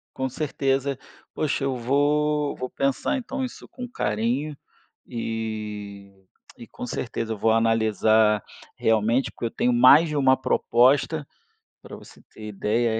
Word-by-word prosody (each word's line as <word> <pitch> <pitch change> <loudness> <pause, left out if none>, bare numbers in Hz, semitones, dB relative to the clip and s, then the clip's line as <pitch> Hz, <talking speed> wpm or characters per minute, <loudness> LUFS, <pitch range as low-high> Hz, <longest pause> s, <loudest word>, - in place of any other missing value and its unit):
Com 130 0 -2
certeza, 135 -1 -1 0.4
poxa, 150 -2 -1
eu 135 -1 0
vou 145 +4 +1
vou 130 0 -5
pensar 140 - -1
então 265 +2 -4
isso 255 - -7
com 250 -1 -8
carinho 125 - -2 0.5
e 105 -3 -5 0.4
e - - -12
com - - -8
certeza 115 -1 -4
eu 110 - -7
vou 110 +2 +2
analisar 110 -1 +3 0.3
realmente, 115 +4 +1
porque - - -6
eu 115 - 0
tenho 125 0 +1
mais 135 +7 +7
de 150 - -4
uma 135 -2 +4
proposta 140 +5 +2 0.5
pra - - -10
você - - -16
ter 110 - -11
ideia 110 +3 0
125 Hz, 140 wpm, -24 LUFS, 110-145 Hz, 0.5 s, mais